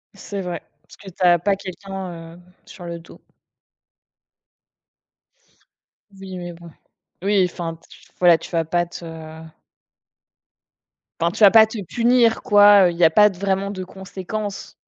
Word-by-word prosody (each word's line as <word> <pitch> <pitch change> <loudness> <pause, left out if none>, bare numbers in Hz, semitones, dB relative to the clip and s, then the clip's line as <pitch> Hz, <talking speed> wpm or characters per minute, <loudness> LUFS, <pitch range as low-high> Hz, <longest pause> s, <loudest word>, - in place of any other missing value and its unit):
C'est 200 0 -7
vrai, 175 -3 -5 0.2
parce - - -18
que 195 - -12
tu 185 0 -7
as 175 -1 +5
pas 195 +3 0
quelqu'un, 185 -3 -8
heu, - - -16 0.3
sur 180 -4 -12
le 170 0 -6
dos. 165 - -17 2.9
Oui, 190 -1 -10
mais 175 -1 -7
bon. 170 0 -14 0.5
Oui 195 -2 +2
enfin 165 -1 -6
t 165 - -26 0.3
voilà, 175 -2 +5
tu - - -11
vas 165 -2 0
pas 175 +2 0
te 175 - -11 2.2
enfin, 170 +1 +1
tu 215 - -1
vas 200 - +9
pas 220 -1 +7
te 220 - -8
punir 235 +2 +2
quoi, 205 -1 +6
heu, - - 0
il 170 - -9
y 175 - +1
a 160 - +7
pas 210 +5 +5
de 190 - -12
vraiment 195 +1 -1
de 185 -2 -6
conséquences. 190 +2 -7
185 Hz, 155 wpm, -21 LUFS, 175-200 Hz, 2.9 s, vas